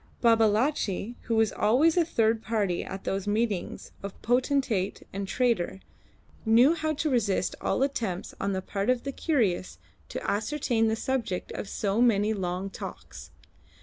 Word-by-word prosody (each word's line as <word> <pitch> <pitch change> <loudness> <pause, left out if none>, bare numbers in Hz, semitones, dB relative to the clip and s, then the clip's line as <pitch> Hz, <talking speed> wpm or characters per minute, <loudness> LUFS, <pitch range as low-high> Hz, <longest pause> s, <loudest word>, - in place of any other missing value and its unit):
Babalatchi, 225 -1 +2
who 230 - 0
was 220 -2 +3
always 285 +9 +3
a 350 - +4
third 225 -7 +1
party 205 -6 -1
at 190 0 -7
those 195 +1 -2
meetings 210 -3 -1
of 200 -1 -7
potentate 245 -5 +1
and 195 0 -3
trader, 195 - 0 0.6
knew 235 +7 +6
how 315 -2 -1
to 305 +2 -1
resist 200 -7 +1
all - - +1
attempts 225 -10 -2
on 195 - 0
the 190 -1 -2
part 200 +4 -2
of 255 -1 +2
the 275 - -3
curious 190 - 0 0.3
to - - -5
ascertain 225 0 +1
the 220 - +1
subject 230 -6 -2
of 200 - -5
so 205 +1 0
many 220 -3 +3
long 190 0 -3
talks. - - -9
220 Hz, 150 wpm, -28 LUFS, 195-250 Hz, 0.6 s, knew